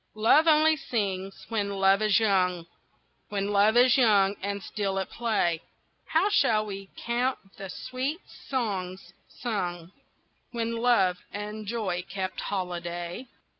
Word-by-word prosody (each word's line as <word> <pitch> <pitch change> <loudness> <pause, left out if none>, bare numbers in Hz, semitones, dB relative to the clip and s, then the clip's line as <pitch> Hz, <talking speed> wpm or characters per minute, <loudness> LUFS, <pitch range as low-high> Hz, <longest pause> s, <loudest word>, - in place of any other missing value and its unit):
LOVE 230 +9 +4
only 315 0 +5
sings 195 -10 -3
when 200 -3 -2
Love 195 +1 +4
is 215 0 +4
young, 180 -5 +1 0.6
When 200 0 -2
Love 205 +3 +4
is 250 +2 +6
young 205 -4 +4
and 200 0 -3
still 195 -2 -2
at 190 - -3
play, 205 -8 0 0.5
How 325 +5 +2
shall 215 - +3
we 195 -1 -7
count 245 +2 0 0.2
the 195 -1 -7
sweet 260 - -4 0.3
songs 190 -8 -3 0.2
sung 180 -7 -4 0.6
When 230 -1 -2
Love 230 -7 +3
and 210 +1 -6
Joy 200 -6 -2
kept 190 0 -4
holiday? 175 +2 -4
205 Hz, 130 wpm, -27 LUFS, 190-235 Hz, 0.6 s, is